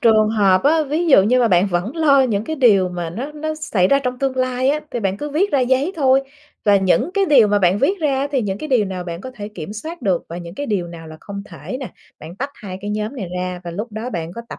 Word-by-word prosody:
trường 215 -2 +4
hợp 200 -4 +3
á, 315 +3 +3
ví 320 +5 0
dụ 265 - +7
như 250 +5 +3
mà 235 - +3
bạn 180 +1 +4
vẫn 195 - -2
lo 280 -4 +5
những 215 -5 0
cái 315 +4 -4
điều 205 -9 +4
mà 175 -2 -4
nó 255 - -5
nó 310 +1 -4
xảy 215 -12 0
ra 275 - +4
trong 250 -2 -3
tương 265 -1 -1
lai 255 0 0
á, 300 +2 +1
thì 240 - -3
bạn 195 -2 -1
cứ 295 +7 -5
viết 365 +8 +1
ra 275 - +3
giấy 260 +7 +1
thôi 270 -2 +3 0.4
và 205 -1 +5
những 190 - +2
cái 395 -1 +3
điều 255 - +5
mà 205 0 +3
bạn 185 +1 +3
viết 370 - +1
ra 285 -4 +1
á 280 - -1
thì 270 -4 0
những 200 -1 -3
cái 310 - -6
điều 245 -6 +3
nào 185 -2 -5
bạn 170 0 -6
có 260 - -7
thể 205 -2 -7
kiểm 205 -2 -8
soát 315 +9 -7
được 190 -6 0
và 170 - -6
những 170 0 -9
cái 285 - -4
điều 195 -7 -1
nào 165 -1 -10
là 155 0 -10
không 200 -1 -7
thể 255 - -7
nè. 260 - -7 0.3
Bạn 165 +4 -10
tách 275 +3 -4
2 190 -3 -8
cái 205 +1 -5
nhóm 215 +5 -3
này 205 -7 -4
ra 180 -1 -3
và 170 - -5
lúc 210 +6 -6
đó 225 +4 -5
bạn 170 -2 -4
có 235 - -7
tập - - -8
220 Hz, 290 wpm, -20 LUFS, 190-275 Hz, 0.4 s, dụ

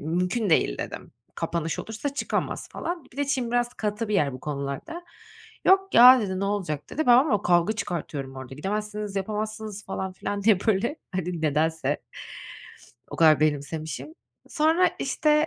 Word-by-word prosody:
Mümkün 180 +7 -1
değil - - +2
dedim. - - -6 0.2
Kapanış 165 -1 -2
olursa 230 +6 -4
çıkamaz - - -2
falan. 345 -3 -5
Bir - - -18
de 285 - 0
Çin 255 -4 -1
biraz 240 0 0
katı 210 +1 -3
bir 210 - -1
yer 145 -8 +2
bu 130 - -8
konularda. 145 - -5 0.6
Yok 385 +1 +4
ya, 250 +2 +9
dedi, 190 -3 -2
ne - - 0
olacak, 190 -8 -3
dedi. 315 -2 -2
Ben 245 0 +8
ama 260 - +2
kavga 175 +3 +3
çıkartıyorum 150 -9 -5
orada, 130 0 -8
gidemezsiniz, 210 +5 -4
yapamazsınız 215 +1 -4
falan 190 -1 -4
filan 200 +2 -4
diye 210 -2 +5
böyle, 225 +8 +1 0.2
hani, 180 -2 -3
nedense 160 +2 +1 1.1
o - - -6
kadar 155 -2 +5
benimsemişim. 155 - -2 0.3
Sonra, 325 +3 +3
işte, 300 +3 +2
205 Hz, 155 wpm, -25 LUFS, 160-245 Hz, 1.1 s, ya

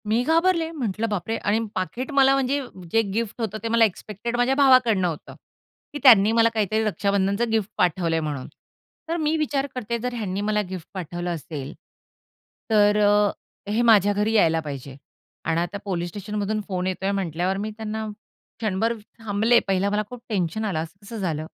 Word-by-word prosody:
मी 220 +3 +2
घाबरले. 330 +1 +2
म्हंटलं 230 - -2
बापरे! 210 +2 -2
आणि 205 +2 0 0.2
पाकीट 185 - -3
मला 270 -1 +5
म्हणजे 275 +1 +1 0.3
जे 225 - +4
गिफ्ट 230 +1 -3
होतं 215 -1 -2
ते - - -1
मला 230 0 +5
एक्स्पेक्टेड 215 +3 -4
माझ्या 245 +2 +2
भावाकडनं 255 -9 +5
होतं, 160 -3 -6 0.6
की 290 - -4
त्यांनी 220 -6 +8
मला 230 0 +4
काहीतरी 220 0 +1
रक्षाबंधनचं 200 +1 0
गिफ्ट 220 -2 0
पाठवलंय 170 -2 +1
म्हणून. 150 -4 -4 0.6
तर 335 - 0
मी 310 -1 +1
विचार 285 -3 0
करते 235 -1 -2
जर 250 +2 -3
ह्यांनी 200 -4 -3
मला 210 0 +1
गिफ्ट 185 -3 -7
पाठवलं 175 -1 -4
असेल, 145 -3 -7 1.0
तर 210 -1 +4
अ, 205 0 +4 0.4
हे 220 +3 +2
माझ्या 205 -4 +5
घरी 210 +2 0
यायला 165 -7 +4
पाहिजे. 140 -3 -7 0.5
आणि 165 +1 +1
आता 175 +3 -3
पोलिस 175 -3 -2
स्टेशनमधून 210 +2 -3
फोन 185 -2 -2
येतोय 190 +1 -1
म्हटल्यावर 185 -1 -1
मी 210 +2 -3
त्यांना 220 0 -4 0.5
क्षणभर 220 +1 0 0.3
थांबले, 225 +2 +3
पहिला 195 +1 +1
मला 210 +1 +1
खूप 250 -1 -9
टेन्शन 210 +1 -1
आलं, 185 -7 -1
असं 190 +5 -14
कसं 225 +2 -7
झालं? 160 -6 -2
210 Hz, 170 wpm, -24 LUFS, 185-230 Hz, 1.0 s, त्यांनी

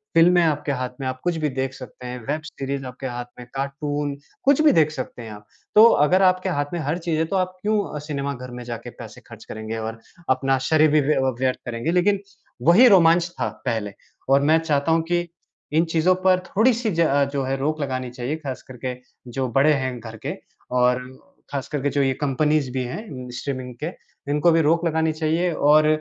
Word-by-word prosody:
फ़िल्में 175 +1 +6
आपके 150 -2 0
हाथ 130 -2 -2
में 135 - -4
हैं, - - 0
आप 130 - -20
कुछ 175 -1 0
भी 150 - +1
देख 130 0 -3
सकते 125 -1 -11
हैं, 125 0 -5
वेब 155 +2 -1
सीरीज़ 135 0 -5
आपके 130 +1 -6
हाथ 120 0 -5
में 125 - -8
है, - - -14
कार्टून, 145 +1 -3 0.3
कुछ 285 +1 +4
भी 305 -2 +6
देख 155 -1 +3
सकते 130 -3 -6
हैं 110 -1 -8
आप। 105 0 -11 0.3
तो 215 - +9 0.2
अगर 185 +4 +3
आपके 185 0 +3
हाथ 145 -4 0
में 170 - -2
हर 155 +3 -1
चीज़ 165 -2 -2
है, 160 - +2
तो 195 - -3
आप 185 0 -1
क्यों 215 +1 +1 0.2
अ, - - -3
सिनेमा 140 -2 -3
घर 125 -1 -9
में 125 0 -7
जाके 120 0 -6
पैसे - - -10
खर्च - - -12
करेंगे 110 +1 -6
और 110 0 -5 0.3
अपना 135 +1 +2
शरीर 155 -1 +4
भी 155 -1 +4
व्य 150 +2 +1 0.2
व्यर्थ 130 -1 +1
करेंगे? 120 +7 -2
लेकिन 190 +3 +2 0.5
वही 225 +9 +8
रोमांच 170 -3 +5
था - - 0 0.2
पहले 110 -5 -2 0.4
और 140 +1 +5
मैं 155 +3 +4
चाहता 155 -1 0
हूँ 165 0 +3
कि 175 +1 -1 0.5
इन 165 +2 +3
चीज़ों 175 +3 +3
पर 185 -1 +5
थोड़ी-सी 230 +1 +2
ज 165 - +5 0.3
जो 140 -1 0
है, 135 +1 -1
रोक 155 +3 -1
लगानी 130 -2 -3
चाहिए, 125 +4 -3
खासकर 130 -3 -8
के 125 -1 -2 0.4
जो 130 +1 -1
बड़े 145 +4 +4
हैं 130 -3 -2
घर 110 -1 -9
के - - -1 0.4
और 125 0 +3 0.5
खासकर 140 0 -3
के 145 - +1
जो 140 +1 0
ये 135 -1 +2
कंपनीज़ 145 -1 +1
भी 130 -1 -2
हैं 130 - -7
स्ट्रीमिंग 130 -2 -5
के, - - 0 0.4
इनको 150 +4 +3
भी 165 0 +4
रोक 165 +3 +2
लगानी 160 0 +1
चाहिए 165 +3 0
और 150 +1 +4
145 Hz, 215 wpm, -23 LUFS, 130-165 Hz, 0.5 s, तो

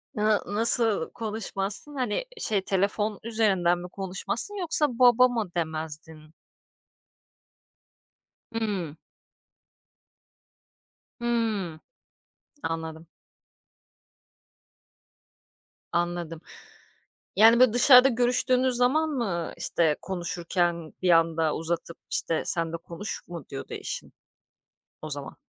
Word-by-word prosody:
Hıı, 210 0 +1
nasıl 225 -3 +5
konuşmazsın? 215 +3 -3
Hani, 250 - -2
şey 210 - 0
telefon 200 +2 -1
üzerinden 195 -6 +1
mi 180 0 -9
konuşmazsın 195 - -2
yoksa 300 -7 +3
baba 250 0 +6
mı 225 -7 -4
demezdin? 155 -1 -5 2.2
Hımm. 200 -9 -3 2.3
Hımm. 220 -9 -2 0.8
Anladım. 160 0 -5 2.8
Anladım. 175 -2 -3 0.9
Yani, 225 +3 +6
böyle, 255 -3 +5
dışarıda 250 +1 +7
görüştüğünüz 250 +1 +2
zaman 305 +6 +1
mı, 195 - -3
işte, 160 -3 +1
konuşurken 175 -2 -3
bir 180 - +1
anda 165 -2 +2
uzatıp, 170 +1 -3
işte, 165 -1 +1
"Sen 165 -1 +2
de - - -3
konuş." 170 +5 -7
mu 170 -5 -9
diyordu 135 - -8
eşin? - - -6 0.9
O 155 - -7
zaman. 140 -1 -3
195 Hz, 85 wpm, -25 LUFS, 165-230 Hz, 2.8 s, dışarıda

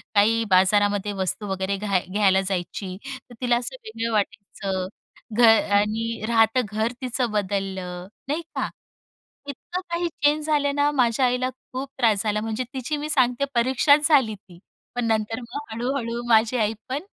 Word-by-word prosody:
काही 225 +3 +4
बाजारामध्ये 205 +2 +3
वस्तू 190 +3 -2
वगैरे 190 +1 -1
घ्या 200 -2 +1
घ्यायला 195 -1 +3
जायची 185 0 -3
तर 260 -2 -9
तिला 245 -1 +3
असं 245 - -4
वेगळं 230 - -3
वाटायचं 200 -2 -2 0.5
घर 225 -2 +7 0.2
आणि 220 +2 -1
राहतं 225 +1 +4
घर 220 +2 0
तिचं 250 -2 -1
बदललं 190 -3 -3 0.2
नाही 300 +4 -1
का - - -1 0.8
इतकं 345 +6 -5
काही 340 +1 0 0.2
चेंज 300 +1 +3
झाले 295 -2 +2
ना 285 +1 +2
माझ्या 255 -2 +2
आईला 250 +1 +1 0.2
खूप 260 +1 -4
त्रास 220 -4 +3
झाला 210 -1 0
म्हणजे 225 +3 -2
तिची 270 +3 -2
मी 300 +1 -4
सांगते 260 -2 +2
परीक्षाच 275 +5 +4
झाली 265 -8 +4
ती 180 -3 -18 0.4
पण 245 -1 -1
नंतर 220 0 0
मग 245 +1 -7
हळूहळू 240 0 -2
माझी 225 +2 +4
आई 215 -1 +1 0.2
पण 275 +5 -2
230 Hz, 155 wpm, -24 LUFS, 205-260 Hz, 0.8 s, घर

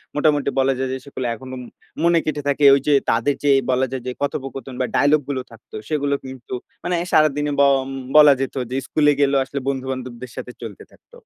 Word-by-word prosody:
মোটামুটি 145 -1 +2
বলা 135 0 +3
যায় 130 0 -2
যে, - - -2
সেগুলো 135 -2 -6
এখনো 130 +3 -9
ম - - -9 0.4
মনে 170 0 +4
গেঁথে 150 -1 -2
থাকে। 140 +1 0
ঐযে 140 +2 +1 0.2
তাদের 115 +5 +1
যে 145 - +2 0.2
বলা 130 +1 +2
যায় 130 -2 -5
যে, - - -1
কথোপকথন 135 -1 -4
বা - - +1
ডায়ালগগুলো 145 -2 +2
থাকত, 115 -1 -18 0.2
সেগুলো 145 -2 0
কিন্তু 130 -1 -9 0.3
মানে 180 - -1 0.2
সারাদিনে 150 -1 +3
ব - - +6 0.6
বলা 150 -2 +9
যেত 135 - -3 0.2
যে 130 - -1
স্কুলে 150 -1 +3
গেলেও 140 -1 +3
আসলে 140 +1 -5
বন্ধু-বান্ধবদের 130 -2 -5
সাথে 125 - -7
চলতে 115 -4 -8
থাকত। - - -25
135 Hz, 185 wpm, -21 LUFS, 130-145 Hz, 0.6 s, বলা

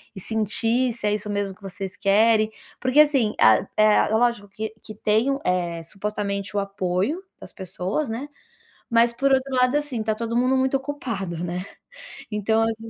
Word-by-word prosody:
e - - -6
sentir 225 +4 0
se 215 -2 -3
é 210 - +2
isso 210 0 -3
mesmo 200 -2 -2
que 210 - -28
vocês 195 0 -6
querem. 215 +2 +3 0.3
Porque 255 +3 +2
assim, 270 -8 +4
a 110 -1 +5
É 215 0 +5
lógico 220 -1 +1
que 220 +2 -5
que 215 - -9
tem 215 +6 +2
o, 275 - -1
eh, 175 -2 -1
supostamente 200 +1 -4
o - - +4
apoio 200 - -1 0.2
das - - -11
pessoas, 190 - -3
né, 235 +6 -4 0.6
mas 235 0 +4
por 275 +3 +1
outro 265 0 +1
lado, 250 +2 +3
assim, 285 -7 -3
tá 220 0 0
todo 230 +1 -3
mundo 255 +2 +3
muito 265 +1 +2
ocupado, 230 - -4
né. 180 +1 -3 0.7
Então, 220 +2 +1
as 225 0 0
215 Hz, 175 wpm, -24 LUFS, 200-250 Hz, 0.7 s, a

